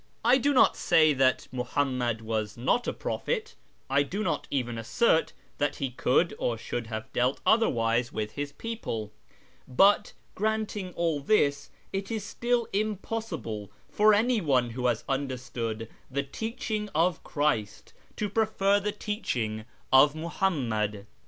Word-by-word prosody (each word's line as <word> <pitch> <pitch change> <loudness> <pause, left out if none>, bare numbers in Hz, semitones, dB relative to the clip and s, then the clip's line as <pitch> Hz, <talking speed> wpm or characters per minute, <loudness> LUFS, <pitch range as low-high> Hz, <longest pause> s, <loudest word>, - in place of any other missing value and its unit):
I 250 +3 +6
do 285 +3 +2
not 260 - +5
say 155 -1 +4
that 130 -1 +2
Muhammad 125 -2 -1
was 110 -1 -3
not 130 - +1
a - - +1
prophet; 455 -2 -3 0.3
I 140 +1 +3
do 195 +9 -2
not - - -1
even 120 -4 -2
assert 160 - +2 0.3
that 145 0 +1
he 135 -2 -3
could 130 +7 +2
or 115 - 0
should 115 +1 -4
have 110 -1 -6
dealt 125 +2 +1
otherwise 120 - +2
with 105 0 -3
his 145 0 -4
people; 145 - -5 0.6
but, 200 +10 +4 0.2
granting 215 -2 -2
all 165 -3 0
this, 145 -3 +2 0.2
it 195 0 -3
is 220 -3 -3
still 240 +1 0
impossible 200 - -3 0.2
for 210 0 +5
any 230 +1 +2
one 130 -7 +2
who 125 +1 -1
has 120 -2 0
understood 125 -5 -3 0.2
the 140 +1 -1
teaching 215 - -4
of 165 +2 +2
Christ 145 -9 -1 0.2
to 210 - -1
prefer 205 -1 +2
the 210 +1 -2
teaching 115 - -3 0.3
of 145 +3 +7
Muhammad. 120 - -1
145 Hz, 140 wpm, -28 LUFS, -, 0.6 s, of